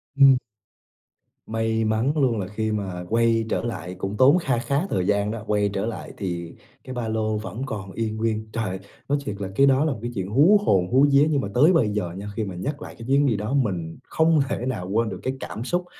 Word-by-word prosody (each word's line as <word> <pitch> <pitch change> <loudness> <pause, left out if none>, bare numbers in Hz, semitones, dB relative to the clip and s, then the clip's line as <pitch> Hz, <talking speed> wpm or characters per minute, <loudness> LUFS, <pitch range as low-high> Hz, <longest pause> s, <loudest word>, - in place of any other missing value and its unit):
Ừm. 135 -2 +7 1.1
May 110 0 0
mắn 110 +5 +1
luôn 125 -6 +2
là 95 - -3
khi 110 +2 -2
mà 95 -4 -3
quay 115 0 +2
trở - - -1
lại 100 -6 -5
cũng 95 +2 -4
tốn 135 +8 +6
kha 135 -9 0
khá 140 +8 -1
thời 90 -2 0
gian 100 0 +1
đó, 110 -1 -5
quay 105 -1 +1
trở 100 - -1
lại 115 - -6
thì 85 -3 -4 0.3
cái 130 - -7
ba 120 -3 -3
lô 110 -1 -1
vẫn 105 +2 -6
còn 100 -6 -6
y 110 +2 -2
nguyên. 110 0 -2
Trời! 105 -5 -2 0.3
Nói 145 - +3
thiệt 105 - -3
là 100 - -2
cái 135 - +5
đó 135 +2 +4
là 155 - +1
một 110 - -9
cái 120 +1 -4
chuyện 95 -1 -3
hú 155 - +5
hồn 90 -3 +3
hú 130 +3 +6
vía. 140 +2 +5
Nhưng 145 -3 +2
mà - - -3
tới 150 +9 +5
bây 130 -11 +3
giờ 105 -5 -2
nha, 100 +1 -6
khi 110 - -1
mà 95 -3 -5
nhắc 140 +11 -4
lại - - -9
cái 115 - -8
chuyến 140 +2 +3
đi 120 -5 +2
đó, 105 +5 -3
mình 90 -12 -1
không 160 0 +2
thể 125 - -2
nào 105 -8 -3
quên 110 +3 +1
được 95 -3 -6
cái 130 - -1
cảm 115 - -6
xúc 175 +7 -1
110 Hz, 245 wpm, -24 LUFS, 100-130 Hz, 1.1 s, Ừm